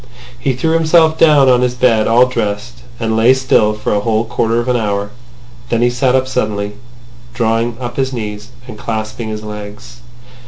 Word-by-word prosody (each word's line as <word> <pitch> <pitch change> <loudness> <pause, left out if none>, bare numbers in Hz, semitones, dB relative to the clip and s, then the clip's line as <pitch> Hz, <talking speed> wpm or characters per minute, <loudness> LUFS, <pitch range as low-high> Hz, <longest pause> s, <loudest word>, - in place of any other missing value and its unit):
He 130 +2 0
threw 160 +6 -1
himself 160 0 +3
down 150 -4 +5
on 125 -1 +4
his 125 0 0
bed 120 -3 +2
all 120 +2 +5
dressed, 120 0 -4 0.2
and 110 -1 -1
lay 115 +4 +5
still 120 -5 +2
for 105 0 -3
a 105 - +1
whole 110 +1 0
quarter 115 +1 0
of 120 - -3
an 125 - +1
hour. 105 -3 -2 0.6
Then 115 0 +1
he 120 - +3
sat 125 +1 +1
up 130 0 +1
suddenly, 105 -5 -2 0.6
drawing 115 0 0
up 120 -1 -6
his 135 -1 0
knees, 105 -3 -6 0.2
and 110 -4 -10
clasping 110 0 -4
his 110 0 -5
legs. 105 +3 -9
120 Hz, 185 wpm, -15 LUFS, 110-125 Hz, 0.6 s, down